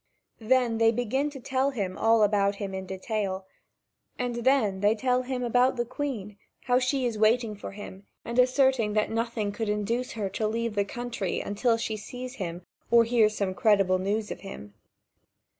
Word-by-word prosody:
Then 235 0 +2
they 225 0 +5
begin 245 +5 -1
to 280 -2 -9
tell 260 +2 0
him 200 -9 -3
all 225 -1 +4
about 200 -1 +2
him 200 -1 -5
in 190 0 -5
detail, 190 0 -3 0.7
and 245 -1 -2
then 235 -6 +2
they 205 +2 +3
tell 250 +2 +1
him 255 0 -3
about 245 +2 +3
the 240 -1 -1
Queen, 235 -6 -5 0.3
how 250 -1 +3
she 260 0 0
is 230 -3 -2
waiting 220 0 +3
for 200 - -8
him 200 -1 -10 0.2
and 235 +2 -1
asserting 255 -4 +3
that 215 0 +1
nothing 225 -2 -1
could 220 +1 -3
induce 220 +4 -1
her 210 -3 -2
to 215 +3 -1
leave 230 +1 -2
the 200 -1 +1
country, 235 -3 -3
until 230 +3 0
she 220 -1 -3
sees 250 +4 -8
him 175 -2 -5 0.3
or 235 0 +6
hears 225 -2 +3
some 195 -2 -1
credible 195 -3 +3
news 210 +3 -1
of - - -5
him. 105 - -9
225 Hz, 180 wpm, -27 LUFS, 205-245 Hz, 0.7 s, or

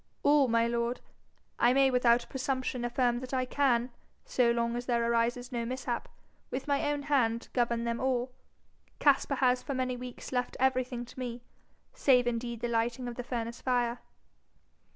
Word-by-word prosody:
'All, 285 -2 +5
my 230 0 +3
lord. 235 +1 -1 0.6
I 240 +1 +5
may 270 0 +4
without 245 -1 +3
presumption 260 -2 -2
affirm 240 0 +1
that 255 +1 -5
I 255 0 +1
can, 250 -2 +1 0.3
so 245 -2 +2
long 235 0 0
as 245 0 -4
there 235 -2 +1
arises 240 +2 0
no 240 -2 -2
mishap, 255 +3 -3 0.4
with 270 +3 -4
my 285 0 +1
own 290 -1 -2
hand 245 -6 +1
govern 235 -1 +1
them 235 0 -2
all. 255 -1 0 0.7
Caspar 280 -1 +3
has 255 -1 +2
for 275 - -4
many 255 -1 -1
weeks 250 0 -8
left 250 -1 -2
everything 255 -2 0
to 245 - -12
me, 240 -1 -5 0.5
save 260 - +4
indeed 235 -1 -2
the 240 - 0
lighting 235 +2 -1
of 240 - -4
the 245 - -5
furnace 235 -1 -4
fire.' 245 -1 0
245 Hz, 170 wpm, -30 LUFS, 235-260 Hz, 0.7 s, All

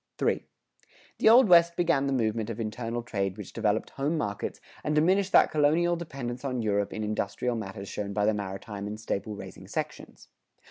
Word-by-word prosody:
III. - - +1 0.8
The - - +6
Old 245 +1 +8
West 170 -1 +6
began 165 -6 +2
the - - 0
movement 115 -3 0
of 115 0 -5
internal 115 +2 -3
trade 100 -4 -2
which 105 -3 -8
developed 110 -1 0
home 145 +4 -1
markets 105 -6 -3 0.2
and 150 - 0
diminished 185 +5 +3
that - - +6
colonial 160 +4 +3
dependence 135 -7 -6
on 130 -4 -2
Europe 100 -1 0
in 110 - -4
industrial 105 +3 -1
matters 100 -3 -6
shown 100 0 -4
by 105 +1 +1
the 110 - +3
maritime 100 0 -5
and 105 +1 -6
staple 105 -1 -3
raising - - -10
sections. - - -6
115 Hz, 180 wpm, -28 LUFS, 105-150 Hz, 0.8 s, Old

